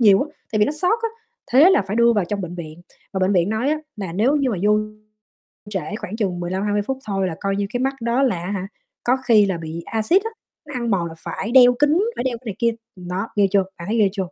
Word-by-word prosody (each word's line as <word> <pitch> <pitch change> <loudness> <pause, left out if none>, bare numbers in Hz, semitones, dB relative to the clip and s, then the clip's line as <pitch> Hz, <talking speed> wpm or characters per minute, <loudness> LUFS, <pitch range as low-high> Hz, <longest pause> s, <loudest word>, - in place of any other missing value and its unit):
nhiều, 200 -4 +6
á, 300 - -6 0.2
tại 215 - +1
vì 210 - +5
nó 290 - -1
xót, 360 +8 +1
á, 455 - +1 0.4
thế 295 +8 +7
là 380 - +4
phải 205 +3 -3
đưa 235 0 +5
vào 205 -5 +1
trong 200 +3 -3
bệnh 175 -1 -5
viện 165 -1 -8 0.3
và 190 - -2
bệnh 185 +2 +2
viện 175 -1 +2
nói 220 +6 0
á 310 - 0 0.2
nà 190 -5 -5
nếu 235 - +2
như 275 -3 +1
mà 210 - -1
vô 210 +1 +4 0.9
trễ 195 -1 -4
khoảng 205 - -6
chừng 190 -6 -1
mười 175 0 -4
lăm, 190 +1 -1
hai 205 0 0
mươi 205 - +2
phút 265 +6 -3
thôi 195 -2 0
là 165 - -4
coi 195 -1 0
như 200 0 -1
cái 245 - 0
mắt 270 +1 +1
đó 235 +3 +1
là, 185 -10 0
á 185 - -4
hả, 195 -2 -3 0.4
có 250 +2 +2
khi 215 -4 +6
là 190 -3 -1
bị 165 0 -6
a-xit, 230 - +2
á, 450 - -3 0.4
nó 290 - -8
ăn 235 -2 -2
mòn 180 -4 +1
là 165 - -8
phải 205 +6 -5
đeo 245 -1 +7
kính, 295 +4 +4 0.2
phải - - -2
đeo 250 -2 -1
cái 250 - -24
này 210 -4 -4
kia, 235 -1 +3 0.2
ừm, 180 -1 -10
đó, 190 +5 -2
ghê 205 -2 +4
chưa? 200 -1 +4
Bạn 170 +2 -8
thấy 225 - 0
ghê 205 -3 +4
chưa? - - -14
210 Hz, 290 wpm, -21 LUFS, 190-245 Hz, 0.9 s, thế